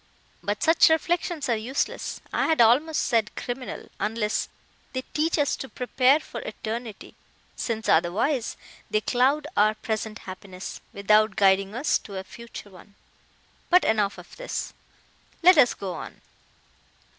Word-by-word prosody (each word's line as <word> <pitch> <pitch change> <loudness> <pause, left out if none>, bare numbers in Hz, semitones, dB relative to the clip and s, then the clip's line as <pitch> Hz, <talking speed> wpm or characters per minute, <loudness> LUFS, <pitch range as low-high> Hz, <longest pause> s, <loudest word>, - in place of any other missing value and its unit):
But 205 +1 -2
such 325 0 +6
reflections 330 -1 0
are 235 - +2
useless, 240 +6 -3
I - - +1
had 320 - +2
almost 270 +8 +4
said 225 -4 0
criminal, 250 +1 -5
unless 215 0 -1 0.4
they 260 -1 -3
teach 320 +3 +1
us 290 -2 +2
to 265 - -7
prepare 255 +3 +3
for - - -8
eternity, 220 0 -6 0.4
since, 225 -2 -3
otherwise, 215 - +1 0.3
they 215 - +1
cloud 265 +6 +2
our 215 +1 +4
present 220 0 -3
happiness, 185 0 -8
without 210 +1 +3
guiding 195 +1 +3
us 265 +5 +1
to 200 -2 -9
a 190 - -4
future 225 0 -11
one. 190 +2 -16 0.7
But 360 +1 +5
enough 210 -2 +1
of - - -13
this; - - -4 0.7
let 365 +2 +8
us 250 -4 +5
go 190 -2 -5
on." - - -8
230 Hz, 140 wpm, -25 LUFS, 210-280 Hz, 0.7 s, let